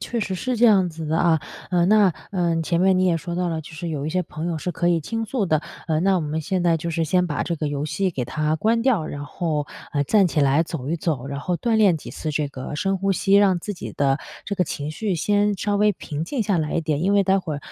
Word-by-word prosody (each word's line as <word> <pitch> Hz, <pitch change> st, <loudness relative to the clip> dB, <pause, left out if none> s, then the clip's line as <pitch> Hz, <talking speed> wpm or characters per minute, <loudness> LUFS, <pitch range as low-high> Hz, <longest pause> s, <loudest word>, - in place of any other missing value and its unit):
确 240 Hz, -, -3 dB
实 195 Hz, -3 st, -2 dB
是 250 Hz, +6 st, -2 dB
这 235 Hz, -, +3 dB
样 195 Hz, -4 st, +5 dB
子 160 Hz, -1 st, -7 dB
的 160 Hz, +2 st, 0 dB
啊。 165 Hz, -2 st, +3 dB, 0.3 s
呃， 175 Hz, -2 st, +3 dB
那， 205 Hz, -2 st, +5 dB, 0.2 s
呃， 170 Hz, -3 st, 0 dB
前 170 Hz, +1 st, 0 dB
面 190 Hz, 0 st, +4 dB
你 185 Hz, -, +3 dB
也 175 Hz, -2 st, +3 dB
说 170 Hz, +3 st, -5 dB
到 180 Hz, 0 st, 0 dB
了， 160 Hz, -1 st, -2 dB
就 155 Hz, -, -12 dB
是 170 Hz, +2 st, -5 dB
有 150 Hz, -2 st, -3 dB
一 -, -, -2 dB
些 185 Hz, +1 st, 0 dB
朋 155 Hz, 0 st, -6 dB
友 170 Hz, -2 st, -1 dB
是 180 Hz, -, -3 dB
可 175 Hz, -, 0 dB
以 170 Hz, -1 st, +3 dB
倾 225 Hz, +8 st, -3 dB
诉 230 Hz, -1 st, -1 dB
的。 155 Hz, -3 st, +2 dB, 0.3 s
呃， 155 Hz, -1 st, +1 dB
那 190 Hz, +1 st, +3 dB
我 -, -, 0 dB
们 155 Hz, 0 st, -2 dB
现 175 Hz, +3 st, -1 dB
在 170 Hz, -1 st, +3 dB
就 170 Hz, -, -4 dB
是 165 Hz, 0 st, 0 dB
先 180 Hz, +3 st, +2 dB
把 150 Hz, -4 st, -2 dB
这 170 Hz, -, -2 dB
个 150 Hz, -1 st, -2 dB
游 145 Hz, 0 st, -2 dB
戏 185 Hz, +5 st, -1 dB
给 130 Hz, -6 st, -3 dB
它 155 Hz, +5 st, -1 dB
关 225 Hz, +6 st, +2 dB
掉， 230 Hz, -11 st, +2 dB
然 145 Hz, 0 st, -6 dB
后， 150 Hz, -2 st, -2 dB, 0.3 s
呃， 145 Hz, -, +1 dB
站 200 Hz, +4 st, +4 dB
起 160 Hz, -3 st, 0 dB
来 140 Hz, +3 st, +4 dB
走 150 Hz, -5 st, -6 dB
一 165 Hz, -, 0 dB
走， 150 Hz, -6 st, -2 dB
然 140 Hz, 0 st, -4 dB
后 175 Hz, +4 st, -1 dB
锻 230 Hz, +2 st, 0 dB
炼 200 Hz, -6 st, +5 dB
几 -, -, -9 dB
次 155 Hz, -, -4 dB
这 150 Hz, -1 st, -1 dB
个 135 Hz, +1 st, -7 dB
深 195 Hz, +5 st, 0 dB
呼 195 Hz, +1 st, +1 dB
吸， 195 Hz, +1 st, +1 dB
让 200 Hz, -3 st, +5 dB
自 205 Hz, +4 st, -5 dB
己 -, -, -7 dB
的 140 Hz, 0 st, +1 dB, 0.3 s
这 200 Hz, -, -2 dB
个 185 Hz, -, +1 dB
情 145 Hz, -2 st, -4 dB
绪 200 Hz, +4 st, -2 dB
先 205 Hz, +4 st, +1 dB
稍 205 Hz, +2 st, -1 dB
微 210 Hz, 0 st, +4 dB
平 155 Hz, -3 st, -5 dB
静 245 Hz, +4 st, -2 dB
下 200 Hz, -3 st, +1 dB
来 155 Hz, -1 st, -2 dB
一 170 Hz, -, +1 dB
点。 155 Hz, -1 st, -1 dB
因 195 Hz, +3 st, +2 dB
为 200 Hz, -1 st, +4 dB
待 190 Hz, +1 st, +3 dB
会 160 Hz, -6 st, -4 dB
170 Hz, 305 characters per minute, -23 LUFS, 155-195 Hz, 0.3 s, 样